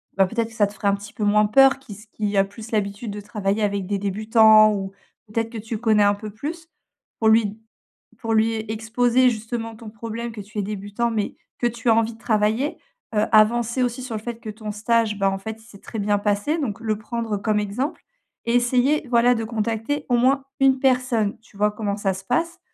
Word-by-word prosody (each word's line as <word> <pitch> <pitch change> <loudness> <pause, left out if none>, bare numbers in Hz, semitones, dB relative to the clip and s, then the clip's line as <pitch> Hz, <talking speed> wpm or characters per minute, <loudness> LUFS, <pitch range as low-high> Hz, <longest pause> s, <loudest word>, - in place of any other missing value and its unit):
bah, 195 0 +4
peut-être, 230 +3 -1
que - - -16
ça 210 -2 +2
te 200 - -11
fera 205 -1 0
un 200 - +2
petit 205 +2 -11
peu 220 - -4
moins 210 +1 +4
peur 270 +5 +5
qui 245 -6 -11
s 210 +3 -13
qui 205 -1 -2
a 195 - +6
plus 215 +3 -10
l'habitude 205 +1 -2
de 205 - -6
travailler 205 0 -2
avec 200 -2 -1
des 200 0 -1
débutants 215 +2 +5
ou, 195 -1 -4 0.4
peut-être, 225 +2 -2
que 230 - -8
tu 220 +1 -5
connais 215 -2 +3
un 205 0 +4
peu 210 +1 -7
plus, 315 +10 -7 0.5
pour 220 - +4
lui 220 0 +5
d 205 +2 -9 0.6
pour 225 -1 -3
lui 220 +1 +3
exposer 235 +3 +2
justement 225 0 -3
ton 220 -1 -10
problème, 230 +2 -6
que 220 - -8
tu 205 +2 -13
es - - +1
débutant, 205 +3 -2
mais 215 -3 -2 0.2
que 240 - 0
tu 235 0 -2
as - - +6
envie 225 0 +1
de - - -18
travailler. 220 +5 0 0.4
Heu, 210 0 +2
avancer 235 +3 +4
aussi 245 +1 -1
sur 245 -3 -4
le 210 - -6
fait 235 0 -5
que 225 - -9
ton 215 0 -6
stage, 215 0 +1
bah, 195 -1 +2
en 195 - -2
fait, 220 +3 -7
il - - -19
s'est 210 -4 -14
très 225 - -7
bien 205 0 +1
passé, 205 +10 0
donc 230 -8 -3
le 220 -2 -1
prendre 225 -1 -3
comme 210 +1 0
exemple. 220 +9 -3 0.5
Et 235 - +1
essayer, 255 +5 +2
voilà, 245 +1 +4
de 225 - -2
contacter, 225 +5 -2
au 245 - +3
moins, 265 +3 +2 0.2
une 270 -1 +4
personne. 250 -5 +1
Tu 225 -2 -22
vois 210 +1 +2
comment 205 -1 -3
ça 200 -2 0
se 190 +1 -9
passe, 335 - -1
220 Hz, 230 wpm, -23 LUFS, 205-235 Hz, 0.6 s, a